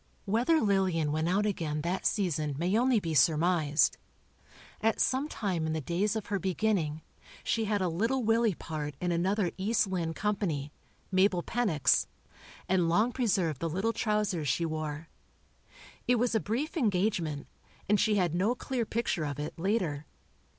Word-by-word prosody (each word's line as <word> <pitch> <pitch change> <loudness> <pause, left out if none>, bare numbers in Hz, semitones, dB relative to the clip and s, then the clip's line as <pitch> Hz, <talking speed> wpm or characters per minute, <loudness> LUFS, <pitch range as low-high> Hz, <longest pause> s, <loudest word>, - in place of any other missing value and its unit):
Whether 240 +11 +2
Lillian 190 -7 +1
went 155 +2 0
out 200 +3 +2
again 160 -7 -2
that 175 +4 -1
season 155 -8 -1
may 175 +6 0
only 245 0 +3
be 165 -5 -3
surmised. 155 +1 +3 0.8
At 225 0 +1
some 265 +3 +1
time 180 - -2
in 160 - -1
the 160 - -1
days 180 +8 -1
of 220 - -3
her 200 -3 -2
beginning, 180 -5 -1 0.4
she 225 -1 0
had 205 -2 0
a - - +1
"Little 225 +10 0
Willie" 225 -2 +2
part 150 -3 -5
in 180 -1 -1
another 185 +2 +1
"East 215 +3 +2
Lynne" 170 -4 -2
Company—Mabel 185 0 -1
Pennock's, 205 - +2 0.6
and 180 -3 +2
long 215 +8 +3
preserved 185 - 0
the 165 - -2
little 195 +8 -1
trousers 210 -9 0
she 135 +6 +1
wore. 155 0 -4 1.0
It 250 - +4
was 240 0 +1
a 220 - +3
brief 240 - -3
engagement, 185 - 0 0.4
and 210 0 +3
she 215 -2 +3
had 180 -5 +1
no 200 +8 +1
clear 245 -3 -3
picture 230 -8 -1
of 145 -1 -4
it, 150 +1 -4
later. 170 -6 -1
185 Hz, 155 wpm, -30 LUFS, 160-215 Hz, 1.0 s, It